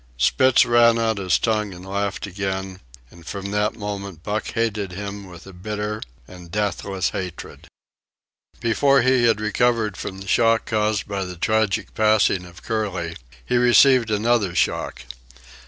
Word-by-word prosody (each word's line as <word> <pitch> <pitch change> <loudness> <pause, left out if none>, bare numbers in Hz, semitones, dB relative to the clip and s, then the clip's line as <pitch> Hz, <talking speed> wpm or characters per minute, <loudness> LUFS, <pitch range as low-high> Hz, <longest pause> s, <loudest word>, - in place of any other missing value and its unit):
Spitz 130 - +4
ran 120 -1 +5
out 110 -2 0
his 95 -2 +2
tongue 105 -4 -1
and 90 +1 -11
laughed 100 +1 -3
again, 95 -1 -4 0.3
and 85 - -15
from 100 +3 -6
that 105 +1 0
moment 100 -5 -6
Buck 105 +1 -2
hated 105 -4 -1
him 100 +1 -6
with 85 -2 -12
a 95 - -12
bitter 105 +3 -4 0.3
and 90 -2 -12
deathless 100 -1 -1
hatred. 90 -3 -7 0.9
Before 135 +3 +3
he 130 -1 +3
had 115 -3 +3
recovered 110 -1 +1
from 95 - -6
the 95 +1 -10
shock 115 0 +3
caused 105 -1 0
by 100 -2 -3
the 90 -1 -7
tragic 110 +2 0
passing 105 -4 +2
of 90 -1 -14
Curly, 95 -7 -3 0.3
he 125 - +1
received 125 0 +5
another 105 -3 +1
shock. - - -1
105 Hz, 150 wpm, -22 LUFS, 95-115 Hz, 0.9 s, ran